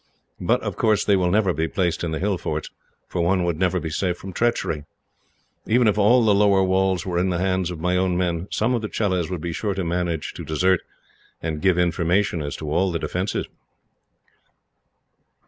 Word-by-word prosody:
But, -, -, +1 dB
of -, -, -4 dB
course, 110 Hz, -3 st, +2 dB
they 100 Hz, -, +4 dB
will 90 Hz, -2 st, +2 dB
never 95 Hz, -1 st, +2 dB
be 80 Hz, +1 st, -1 dB
placed 90 Hz, -3 st, -1 dB
in 85 Hz, -, -1 dB
the 80 Hz, -, -2 dB
hill 95 Hz, 0 st, -1 dB
forts, 75 Hz, 0 st, -4 dB, 0.4 s
for 90 Hz, -, -2 dB
one 90 Hz, +2 st, +2 dB
would 85 Hz, -2 st, -1 dB
never 90 Hz, -1 st, +1 dB
be 80 Hz, -1 st, -5 dB
safe 90 Hz, +2 st, -1 dB
from 95 Hz, 0 st, -9 dB
treachery. 115 Hz, -9 st, 0 dB, 0.8 s
Even 120 Hz, +1 st, +4 dB
if 105 Hz, -, +3 dB
all 115 Hz, +4 st, +4 dB
the 105 Hz, -, +5 dB
lower 100 Hz, -1 st, +4 dB
walls 95 Hz, -1 st, +1 dB
were 90 Hz, -2 st, -1 dB
in 95 Hz, +1 st, +1 dB
the 90 Hz, -, 0 dB
hands 95 Hz, -1 st, 0 dB
of 90 Hz, -3 st, -6 dB
my 90 Hz, +2 st, 0 dB
own 90 Hz, -1 st, +1 dB
men, 90 Hz, 0 st, -1 dB
some 115 Hz, +4 st, 0 dB
of 120 Hz, -, 0 dB
the 110 Hz, -, -4 dB
Chelahs 95 Hz, -6 st, -1 dB
would 90 Hz, -4 st, -4 dB
be 85 Hz, 0 st, -3 dB
sure 100 Hz, +2 st, -2 dB
to 95 Hz, -, -2 dB
manage 85 Hz, -2 st, -2 dB
to -, -, -7 dB
desert, 85 Hz, +5 st, +2 dB, 0.6 s
and 80 Hz, -2 st, -4 dB
give 95 Hz, -2 st, +3 dB
information 90 Hz, +1 st, +1 dB
as 70 Hz, -1 st, -4 dB
to 75 Hz, -1 st, -5 dB
all 95 Hz, +4 st, +2 dB
the 85 Hz, -, -1 dB
defences." 90 Hz, +4 st, -2 dB
90 Hz, 205 wpm, -23 LUFS, 85-100 Hz, 0.8 s, the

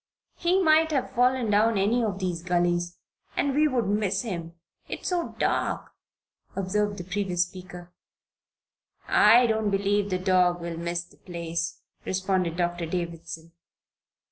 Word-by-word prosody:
"He 355 Hz, +2 st, +1 dB
might 320 Hz, 0 st, +5 dB
have 270 Hz, -2 st, 0 dB
fallen 250 Hz, -2 st, +2 dB
down 215 Hz, +1 st, +3 dB
any 220 Hz, +5 st, +2 dB
of 205 Hz, -4 st, -1 dB
these 180 Hz, -3 st, -2 dB
gullies, 175 Hz, 0 st, 0 dB, 0.4 s
and 280 Hz, -, +1 dB
we'd 305 Hz, +2 st, +4 dB, 0.2 s
miss 205 Hz, 0 st, 0 dB
him, 170 Hz, -7 st, -5 dB, 0.3 s
it's -, -, -4 dB
so 355 Hz, -2 st, -2 dB
dark," -, -, -1 dB, 0.6 s
observed 205 Hz, +2 st, -1 dB
the 180 Hz, -, -5 dB
previous 180 Hz, -1 st, 0 dB
speaker. 180 Hz, -1 st, -11 dB, 1.1 s
"I 230 Hz, +4 st, +6 dB
don't 220 Hz, -2 st, +1 dB
believe 200 Hz, +1 st, +1 dB
the 185 Hz, -, 0 dB
dog 180 Hz, -1 st, +3 dB
will 170 Hz, -1 st, -5 dB
miss 170 Hz, +1 st, -2 dB
the 175 Hz, -, -22 dB
place," 170 Hz, -1 st, -4 dB, 0.2 s
responded 185 Hz, -3 st, -1 dB
Doctor 175 Hz, -1 st, -1 dB
Davison. 170 Hz, -1 st, -5 dB
185 Hz, 135 wpm, -26 LUFS, 175-215 Hz, 1.1 s, I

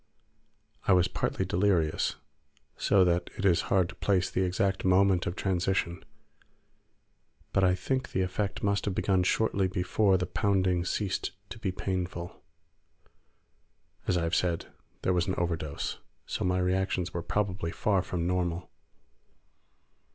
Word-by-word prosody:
I -, -, +6 dB
was 90 Hz, -1 st, +4 dB
partly 95 Hz, -, -1 dB
delirious, 90 Hz, -4 st, +1 dB, 0.6 s
so 95 Hz, -2 st, +4 dB
that 85 Hz, 0 st, +1 dB
it 100 Hz, -, -2 dB
is 90 Hz, -3 st, +4 dB
hard 95 Hz, -3 st, +3 dB
to -, -, -7 dB
place 95 Hz, -3 st, +1 dB
the -, -, 0 dB
exact 95 Hz, +1 st, 0 dB
moment 95 Hz, 0 st, +3 dB
of 85 Hz, -, -2 dB
transition, 90 Hz, -2 st, -1 dB, 1.5 s
but 95 Hz, -, +3 dB
I 90 Hz, -1 st, +4 dB
think 130 Hz, +8 st, -2 dB
the 95 Hz, -, 0 dB
effect 95 Hz, +2 st, -2 dB
must 100 Hz, -1 st, +1 dB
have 100 Hz, -3 st, -1 dB
begun 95 Hz, -2 st, +2 dB
shortly 95 Hz, +1 st, +2 dB
before 95 Hz, +2 st, +2 dB
the 90 Hz, -, -1 dB
pounding 95 Hz, -1 st, +1 dB
ceased 95 Hz, -1 st, -2 dB, 0.2 s
to -, -, -7 dB
be 100 Hz, -4 st, -1 dB
painful. 90 Hz, -2 st, -4 dB, 1.7 s
As 90 Hz, -, +2 dB
I 85 Hz, -, 0 dB
have 85 Hz, -, -2 dB
said, 85 Hz, -2 st, +1 dB, 0.4 s
there 90 Hz, -, +2 dB
was 90 Hz, +1 st, +1 dB
an 95 Hz, -, 0 dB
overdose; 85 Hz, -4 st, -2 dB, 0.3 s
so -, -, -3 dB
my 90 Hz, 0 st, +1 dB
reactions 90 Hz, -1 st, 0 dB
were 85 Hz, -, -2 dB
probably 95 Hz, -2 st, -1 dB
far 100 Hz, +2 st, +1 dB
from 85 Hz, -1 st, -3 dB
normal. 90 Hz, -1 st, -1 dB
90 Hz, 145 wpm, -29 LUFS, 90-95 Hz, 1.7 s, I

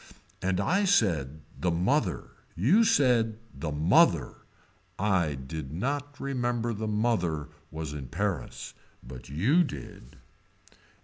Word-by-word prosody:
And 95 Hz, -1 st, 0 dB
I 190 Hz, -, +2 dB
said 80 Hz, -, +1 dB
the 90 Hz, -, -1 dB
mother 90 Hz, -, 0 dB, 0.2 s
you 155 Hz, -, +4 dB
said 120 Hz, -, +3 dB, 0.2 s
the 80 Hz, -2 st, -4 dB
mother. 75 Hz, +3 st, +3 dB, 0.5 s
I 90 Hz, -7 st, +1 dB
did 65 Hz, +1 st, -7 dB
not 140 Hz, -, -3 dB
remember 120 Hz, -3 st, -1 dB
the 110 Hz, +1 st, -4 dB
mother 105 Hz, -9 st, 0 dB, 0.2 s
was 80 Hz, -2 st, -5 dB
in 70 Hz, -3 st, -6 dB
Paris 95 Hz, +6 st, -3 dB, 0.3 s
but 65 Hz, +1 st, -10 dB
you 115 Hz, -, +3 dB
did. 70 Hz, -, -9 dB
95 Hz, 115 wpm, -28 LUFS, 75-120 Hz, 0.5 s, you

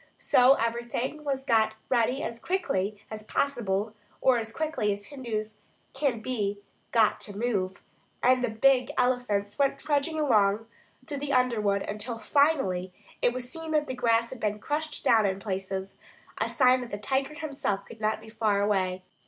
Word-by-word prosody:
So 255 Hz, +2 st, +5 dB
everything 235 Hz, +5 st, -2 dB
was 270 Hz, -2 st, -2 dB
got 220 Hz, -4 st, +3 dB
ready 250 Hz, +2 st, +1 dB
as 230 Hz, 0 st, -4 dB
quickly 215 Hz, -, -1 dB
as 215 Hz, 0 st, -5 dB
possible, 215 Hz, -4 st, -1 dB, 0.3 s
or 255 Hz, -2 st, +4 dB
as 225 Hz, 0 st, -5 dB
quickly 310 Hz, -6 st, -1 dB
as 200 Hz, 0 st, -4 dB
Hindus 220 Hz, -6 st, -5 dB, 0.3 s
can 265 Hz, -5 st, 0 dB
be 210 Hz, -5 st, -1 dB, 0.3 s
got 225 Hz, -3 st, +3 dB
to 200 Hz, -1 st, -5 dB
move, 200 Hz, -5 st, -1 dB, 0.4 s
and 255 Hz, 0 st, +4 dB
the 245 Hz, -, +1 dB
big 255 Hz, +3 st, +3 dB
elephants 245 Hz, -4 st, 0 dB
went 275 Hz, -1 st, +2 dB
trudging 300 Hz, +2 st, 0 dB
along 215 Hz, -6 st, +3 dB, 0.4 s
through 285 Hz, 0 st, -5 dB
the 280 Hz, 0 st, -2 dB
underwood 215 Hz, -6 st, +2 dB
until 220 Hz, +3 st, -4 dB
finally 225 Hz, -, +2 dB, 0.3 s
it 245 Hz, -, +4 dB
was 245 Hz, 0 st, -5 dB
seen 325 Hz, +2 st, -7 dB
that 300 Hz, -1 st, +2 dB
the 260 Hz, -, -4 dB
grass 230 Hz, -2 st, +2 dB
had 260 Hz, -, -7 dB
been 210 Hz, -1 st, -1 dB
crushed 300 Hz, +6 st, -3 dB
down 220 Hz, -3 st, +5 dB
in 190 Hz, 0 st, -2 dB
places, 190 Hz, -1 st, -4 dB, 0.4 s
a -, -, 0 dB
sign 255 Hz, -1 st, +4 dB
that 245 Hz, -, -6 dB
the 205 Hz, -, -4 dB
tiger 270 Hz, +6 st, -1 dB
himself 280 Hz, -11 st, -3 dB
could 225 Hz, -1 st, -13 dB
not 215 Hz, 0 st, 0 dB
be 220 Hz, -, -13 dB
far 215 Hz, -2 st, +1 dB
away. 190 Hz, -3 st, 0 dB
230 Hz, 170 wpm, -28 LUFS, 210-270 Hz, 0.4 s, So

